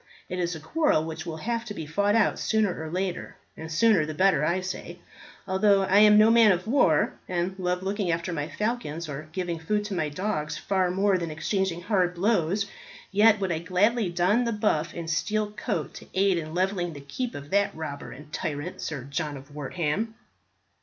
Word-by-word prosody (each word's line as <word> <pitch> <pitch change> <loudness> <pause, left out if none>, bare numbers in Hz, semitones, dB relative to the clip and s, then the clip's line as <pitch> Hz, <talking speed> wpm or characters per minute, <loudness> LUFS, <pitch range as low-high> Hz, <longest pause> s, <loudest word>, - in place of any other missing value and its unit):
It 180 - -3
is 175 -1 -1
a - - -7
quarrel 160 - +1
which 160 +2 -6
will 160 -1 -4
have 230 +6 -2
to 210 -3 -6
be 160 - -5
fought 200 +7 +1
out 225 -2 +2
sooner 210 -7 0
or 160 - -5
later, 180 +1 -3 0.2
and 160 - -7
the - - -10
sooner 210 0 +4
the 155 0 -5
better, 190 -3 +3 0.2
say 180 -1 -6 0.5
I. - - -5
Although 195 +1 +4
I 190 +1 +4
am 210 0 +7
no 215 +1 +7
man 230 -2 +7
of 180 -1 0
war, 220 - +3 0.2
and 180 +1 -1
love 180 0 -1
looking 195 -1 -1
after 170 +1 -1
my 150 -2 -2
falcons 210 -8 -3
or 150 +1 -7
giving 175 -1 -3
food 205 +6 -1
to 210 - -4
my 160 -5 -1
dogs 150 -2 -2
far 190 -2 0
more 195 +1 +2
than 170 -1 -3
exchanging 175 +2 -1
hard 180 -3 +1
blows, 195 0 +1 0.5
yet 215 +1 +6
would 190 -2 -1
I 160 - 0
gladly 195 +5 +1
don 180 +7 +2
the 235 - 0
buff 170 -7 0
and 170 -1 -5
steel 210 +6 0
coat 210 - -3
to - - -11
aid 190 -2 +3
in 155 0 -6
levelling 180 -2 0
the 145 - -9
keep 235 - -4
of 145 +1 -8
that 200 0 +3
robber 155 -3 -6
and 150 +3 -12
tyrant, 150 +4 -4
Sir 145 -5 -4
John 145 +1 -3
of 135 +2 -13
Wortham." 165 +9 -2
180 Hz, 205 wpm, -26 LUFS, 160-205 Hz, 0.5 s, am